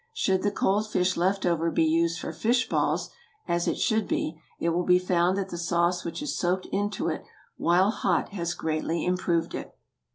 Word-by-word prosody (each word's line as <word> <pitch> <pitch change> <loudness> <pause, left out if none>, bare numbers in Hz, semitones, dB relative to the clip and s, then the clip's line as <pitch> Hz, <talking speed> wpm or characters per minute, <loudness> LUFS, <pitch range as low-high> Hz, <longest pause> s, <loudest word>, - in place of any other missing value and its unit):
Should 190 - +1
the 205 - +2
cold 205 +1 0
fish 185 -2 +1
left 190 +3 +1
over 170 -1 +1
be 165 - +2
used 165 +1 +2
for - - -5
fish 240 +2 +1
balls—as 430 - -2
it - - 0
should 220 -1 +1
be—it 165 +1 -3
will 170 +2 +1
be 180 0 +5
found 180 0 +1
that 195 -1 -2
the 175 - -5
sauce 170 +1 +1
which 170 - -5
has 295 - -3
soaked 185 +1 0
into 205 -1 -1
it 160 - -2 0.3
while 180 +4 +3
hot 180 -6 0
has 170 -4 -3
greatly 160 +1 -2
improved 175 -2 0
it. - - -7
180 Hz, 185 wpm, -27 LUFS, 170-195 Hz, 0.3 s, be